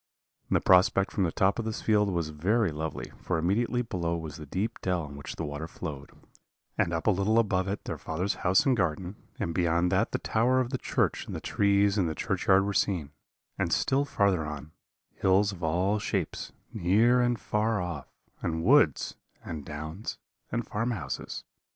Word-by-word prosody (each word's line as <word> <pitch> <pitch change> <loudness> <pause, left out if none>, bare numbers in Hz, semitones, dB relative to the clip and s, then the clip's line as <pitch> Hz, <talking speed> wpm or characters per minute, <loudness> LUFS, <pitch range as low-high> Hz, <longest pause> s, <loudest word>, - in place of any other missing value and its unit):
The - - +3
prospect 95 +1 +4
from 95 - +1
the 85 - 0
top 95 +6 +2
of 115 - -2
this 110 -1 -4
field 105 -2 +3
was 85 -4 -1
very 95 +6 +1
lovely, 80 +1 -5
for - - -1
immediately 115 +9 +1
below 85 -6 -2
was 80 -3 -7
the 75 -2 -9
deep 105 - -3
dell 90 -3 0
in 70 -1 -9
which 70 - -7
the - - -4
water 75 +2 -5
flowed, 70 -4 -7 0.6
and 85 - +1
up 85 -1 -2
a 110 - +5
little 100 +4 +2
above 95 -4 +2
it 100 +1 -3
their - - -5
father's 90 +5 -1
house 90 +1 +4
and 135 -2 +4
garden, 90 -1 -1 0.2
and 85 -6 -2
beyond 85 0 +2
that 100 +4 +2
the - - 0
tower 125 +4 +2
of 125 -1 -1
the 130 - -2
church - - 0
and - - -5
the - - -3
trees 100 0 +2
in 90 - +2
the 80 - -3
churchyard 95 +6 +2
were 100 - -1
seen; 90 -8 0 0.5
and - - 0
still 135 +1 +2
farther 100 - +1
on, 75 0 -6 0.4
hills 100 +2 +3
of 95 -3 -10
all 90 +6 +1
shapes, 95 -5 -3 0.2
near 115 +8 +4
and 120 -2 +1
far 105 0 0
off, 85 -6 -4 0.3
and 80 0 -2
woods, 120 - +4 0.3
and 80 -3 -5
downs, 80 +6 -6 0.3
and 120 0 -1
farmhouses. 105 - -3
95 Hz, 190 wpm, -28 LUFS, 80-105 Hz, 0.6 s, a